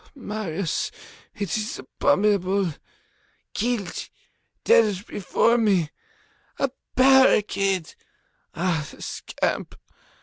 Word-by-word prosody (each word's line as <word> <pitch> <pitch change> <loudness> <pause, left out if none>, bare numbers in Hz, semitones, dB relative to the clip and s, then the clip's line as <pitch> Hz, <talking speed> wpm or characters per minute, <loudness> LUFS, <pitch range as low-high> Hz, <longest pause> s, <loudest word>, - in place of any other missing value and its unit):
Marius! 205 - -3 0.5
It 200 -5 -2
is 220 +5 -3
abominable! 200 - +1 0.8
Killed! 225 -5 -2 0.5
Dead 210 - +4
before 230 +4 +1
me! 190 -8 +2 0.7
A 275 - 0 0.2
barricade! 210 -9 +4 0.6
Ah, 165 -4 0
the - - -14
scamp! - - -3
205 Hz, 75 wpm, -24 LUFS, 185-230 Hz, 0.8 s, Dead